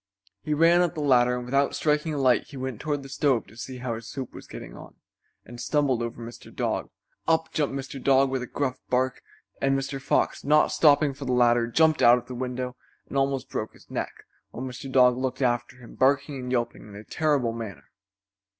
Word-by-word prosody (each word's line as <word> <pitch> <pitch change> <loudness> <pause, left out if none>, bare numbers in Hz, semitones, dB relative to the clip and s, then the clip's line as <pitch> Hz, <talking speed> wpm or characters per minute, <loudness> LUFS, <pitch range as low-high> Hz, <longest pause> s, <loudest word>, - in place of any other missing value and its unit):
He 150 - -1
ran 170 +3 +5
up 175 -1 0
the - - -4
ladder, 125 -3 +4
and 125 0 -5
without 135 +3 +1
striking 150 +1 +1
a 150 - -2
light 130 -3 +3
he 140 - -11
went 130 -3 -5
toward 145 -2 -2
the - - -9
stove 135 -4 +1
to 110 - -17
see 130 +2 -7
how 125 -1 -3
his 115 0 -7
soup 135 -3 -6
was - - -11
getting - - -9
on, - - -12 0.5
and 120 +1 -9
stumbled 140 -5 +1
over 115 0 -4
Mr. 115 0 -10
Dog. - - -2 0.4
Up 160 0 +2
jumped 145 -3 0
Mr. 135 -1 -6
Dog 135 0 +4
with 130 -1 -1
a 125 - -5
gruff 135 -3 -2
bark, 130 +1 0 0.4
and 135 0 +2
Mr. 135 0 -4
Fox, 135 - 0
not 150 +2 +4
stopping 145 -2 +4
for 140 +1 -8
the 125 - 0
ladder, 120 -1 +4
jumped 160 +5 +3
out 120 +1 +7
of 125 - -7
the 130 - -8
window 125 0 -4 0.3
and - - -7
almost 135 -1 0
broke 110 - -3
his - - -20
neck, - - -4 0.3
while 130 - -6
Mr. 130 +1 -7
Dog 125 -1 +5
looked 130 +1 -2
after 120 -1 0
him, 120 -2 -13
barking 140 +1 +1
and 125 0 -5
yelping 120 -2 -1
in 105 -1 -12
a 105 - -9
terrible 140 -4 0
manner. 115 -4 -8
130 Hz, 215 wpm, -26 LUFS, 125-140 Hz, 0.5 s, out